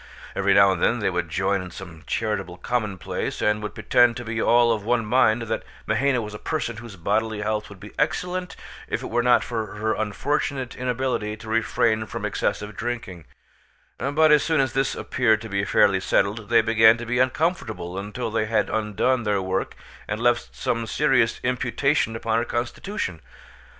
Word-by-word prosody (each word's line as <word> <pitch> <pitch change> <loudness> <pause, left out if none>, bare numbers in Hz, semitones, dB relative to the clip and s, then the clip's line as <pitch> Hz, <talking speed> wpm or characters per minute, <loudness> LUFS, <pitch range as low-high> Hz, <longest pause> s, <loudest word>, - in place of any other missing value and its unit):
Every 100 0 +2
now 100 -1 +7
and 90 -3 -2
then 120 - +3
they 105 -4 0
would 90 -2 -2
join 95 +3 0
in 90 - -7
some 90 -3 -10
charitable 95 -5 -2
commonplace, 105 -6 -3
and 105 0 +1
would 105 -1 -6
pretend 115 +2 +3
to 120 - -6
be 110 0 -2
all 120 0 +4
of 110 -3 -1
one 115 +1 +1
mind 115 0 +3
that 110 0 -2 0.2
Mahaina 135 -3 +1
was 105 0 -7
a 105 - -7
person 145 -8 -3
whose 115 -2 -9
bodily 105 +4 -1
health 105 0 -2
would 100 -2 -12
be 105 +2 -11
excellent 180 +4 -1 0.3
if - - -3
it - - -6
were 120 +1 +2
not 120 0 +4
for 110 -4 -4
her 110 +1 0
unfortunate 130 +4 -2
inability 125 -4 -2
to 110 - -12
refrain 115 0 +1
from - - -5
excessive 105 0 -2
drinking; 115 -9 -5 0.7
but 155 +3 +3
as 150 -1 +6
soon 160 -2 +1
as 130 -2 +1
this 135 0 0
appeared 110 -4 +1
to 110 - -8
be 100 0 -1
fairly 100 0 +4
settled 100 +3 0
they 115 -1 +5
began 110 0 +5
to 120 - -6
be 120 +1 -1
uncomfortable 130 - -1
until 105 +4 -4
they 110 -1 0
had 110 -2 +1
undone 110 +4 +1
their 105 -3 0
work 95 0 -2 0.3
and 105 - -3
left 120 0 +1
some 115 -1 -2
serious 130 -3 +2
imputation 125 0 0
upon 115 0 0
her 120 - -1
constitution. 120 - -3
110 Hz, 185 wpm, -24 LUFS, 105-125 Hz, 0.7 s, now